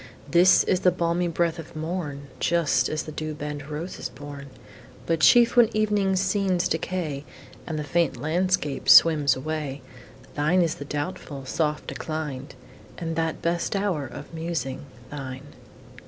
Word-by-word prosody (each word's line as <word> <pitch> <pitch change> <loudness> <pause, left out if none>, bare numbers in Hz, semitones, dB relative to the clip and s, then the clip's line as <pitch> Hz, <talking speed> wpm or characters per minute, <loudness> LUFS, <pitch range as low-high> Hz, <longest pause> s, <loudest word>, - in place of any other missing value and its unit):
Thine 170 - +6 0.2
is 180 - +2
the 180 - +4
balmy 175 0 0
breath 170 0 0
of 160 - -10
morn, 155 -3 -4
Just 170 -3 +2
as 155 - -2
the 155 - -8
dew 155 0 -4
bent 145 0 -6
rose 155 +4 -5
is - - -4
born. 140 +1 -9 0.6
But 165 -1 0
chief 235 +9 +6
when 240 -3 +6
evening 205 -3 +2
scenes 190 -1 +1
decay 160 -4 -3 0.4
And 160 - -3
the 150 - -2
faint 165 +2 0
landscape 170 -2 0
swims 150 -5 +7
away, 145 -1 -4 0.5
Thine 155 +5 +2
is 165 - 0
the 145 - -8
doubtful, 145 -2 -5
soft 150 +2 -1
decline, 150 -4 -5 0.5
And 165 -1 -4
that 160 -1 -2
best 170 +3 0
hour 190 -9 -1
of 145 +6 -10
musing 160 -5 -4 0.2
thine. 135 -1 -7
160 Hz, 150 wpm, -25 LUFS, 145-175 Hz, 0.6 s, swims